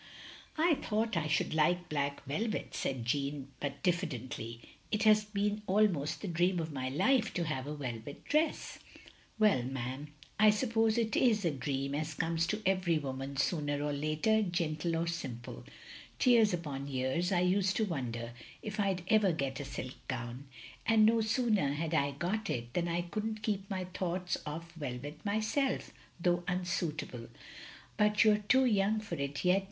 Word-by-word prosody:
" - - -18
"I 325 +1 +4
thought 220 0 0
I 160 -2 0
should 155 +1 +1
like 175 +3 +2
black 140 -1 -2
velvet," 210 +10 -2
said 130 -4 -2
Jeanne, 140 +2 -1
but 145 0 -4
diffidently. 130 - -2 0.3
"It 215 0 +1
has 215 -1 +6
been 210 0 -1
almost 185 -7 +2
the - - -2
dream 175 +1 +2
of 160 -1 -3
my 130 -2 -2
life 220 - +2
to 175 - +1
have 145 -4 -3
a 150 - -4
velvet 125 -1 -6
dress. 310 +2 0 0.2
" - - -19
" - - -30
Well, 215 -9 +4
'm, 130 +3 -4 0.3
I 215 0 +8
suppose 225 0 +2
it 225 -2 +1
*s 220 -6 +3
a 165 - +3
dream 140 0 -2
as 155 +1 -2
comes 165 +1 0
to 215 +3 -2
every 185 -3 +2
woman 135 -1 -4
sooner 145 -1 0
or 145 0 -1
later, 155 +10 +2
gentle 170 -3 -1
or 165 +1 0
simple. 130 -8 -5 0.6
Years 235 -4 +6
upon 145 -6 -3
years 135 +7 0
I 175 -2 +3
used 190 +1 +2
to 220 - +2
wonder 120 - -3 0.3
if 210 0 -5
I 200 -2 +2
*d 180 - -8
ever 215 -3 +4
get 140 -4 -2
a 140 - -4
silk 130 -1 -5
gown; 125 +1 -4 0.4
and 220 -1 +5
no 225 +1 +4
sooner 220 - +2
had 160 +2 -2
I 140 -3 +2
got 195 +8 -2
it, 120 0 -3
than 175 -1 0
I 170 +1 0
could 210 +5 -4
n't 215 -1 -5
keep 200 -3 -1
my 185 -2 -2
thoughts 180 0 -2
off 165 +3 -6
velvet 145 -1 -6
myself, 220 +7 0 0.3
though 175 0 +2
unsuitable. 170 -8 -2 0.7
But 210 +1 +4
you 215 -1 +6
're - - +3
too 260 +2 +5
young 210 -2 +3
for 215 - -7
it 140 +3 -3
yet. 180 +2 +5
170 Hz, 180 wpm, -32 LUFS, 140-210 Hz, 0.7 s, I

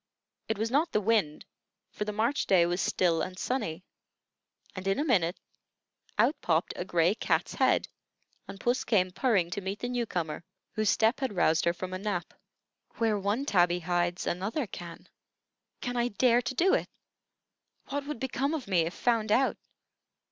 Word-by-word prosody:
It 220 - -1
was 225 +2 -1
not 315 +5 +2
the - - +3
wind, 205 -8 +1 0.5
for 210 - -4
the 210 - -2
March 230 +7 0
day 180 -3 +5
was 175 +2 -1
still 170 -3 +1
and 185 0 -4
sunny, 190 -9 -2 0.9
and 185 0 -5
in 195 - +2
a 290 - +1
minute 180 - +2 0.8
out - - +4
popped 165 0 +1
a - - -3
gray 175 0 +2
cat's - - 0
head, - - +2 0.6
and 195 - -9
puss 245 +3 +1
came 185 -5 +2
purring 195 -7 +1
to 200 - -3
meet 195 +2 -4
the 245 - -4
new 245 -2 -1
comer 160 -4 -3 0.3
whose 215 -1 0
step 225 +3 +3
had 265 -7 -2
roused 165 -2 +3
her 170 - +3
from 185 +1 -6
a 185 - -3
nap. 195 -3 -3 0.6
"Where 220 -3 +1
one 205 +8 -1
tabby 180 -6 +3
hides, 175 +1 -1
another 205 - -1
can. 175 -4 -9 0.7
Can 245 -1 -3
I 240 0 +2
dare 245 +2 +3
to 250 +2 -4
do 375 +8 +3
it? - - +1 1.0
What 285 0 -3
would 300 -5 -4
become 265 +4 -1
of 285 -8 -5
me 185 -3 +2
if 170 - -6
found 225 -3 +1
out? 265 +4 +3
205 Hz, 175 wpm, -29 LUFS, 175-245 Hz, 1.0 s, day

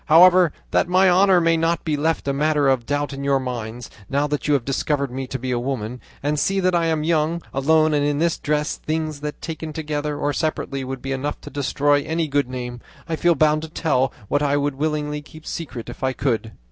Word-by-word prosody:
However, 175 +1 +7 0.2
that - - +2
my 185 +1 +5
honour 190 0 +5
may 165 -1 +3
not 165 +1 0
be 155 -2 +1
left 160 +1 0
a 140 - +1
matter 150 0 +2
of 130 -3 +1
doubt 145 0 -1
in 140 0 -6
your 140 -1 +2
minds, 120 -2 -5 0.2
now 140 +2 +1
that 150 0 -2
you 145 - +4
have 125 -4 -1
discovered 140 0 -1
me 130 +1 -4
to 130 - -4
be 130 0 -4
a 120 - 0
woman, 125 -2 -4 0.2
and 145 +1 0
see 195 +5 +1
that 185 -1 +2
I 170 -1 +2
am 160 -2 0
young, 165 +1 +1
alone, 155 +3 +3
and 145 -1 +2
in 145 0 +1
this 165 +2 +1
dress, 150 0 -1
things 155 -1 -3
that 150 0 -5
taken 160 -1 -5
together 150 -1 -3
or 145 0 0
separately 140 -2 -2
would 130 0 -6
be 135 - -3
enough 140 +2 -2
to - - -10
destroy 145 0 +1
any 160 +2 -1
good 140 -2 0
name, 125 -1 -5 0.3
I 165 - -1
feel 170 +1 +3
bound 155 +1 +3
to 160 - -7
tell 135 -5 +1 0.2
what 145 - +1
I 145 0 +2
would 145 0 0
willingly 150 +1 -2
keep 155 +1 -14
secret 135 -8 -6
if 120 - -9
I 130 0 +1
could." 115 -5 -1
145 Hz, 230 wpm, -22 LUFS, 135-160 Hz, 0.3 s, However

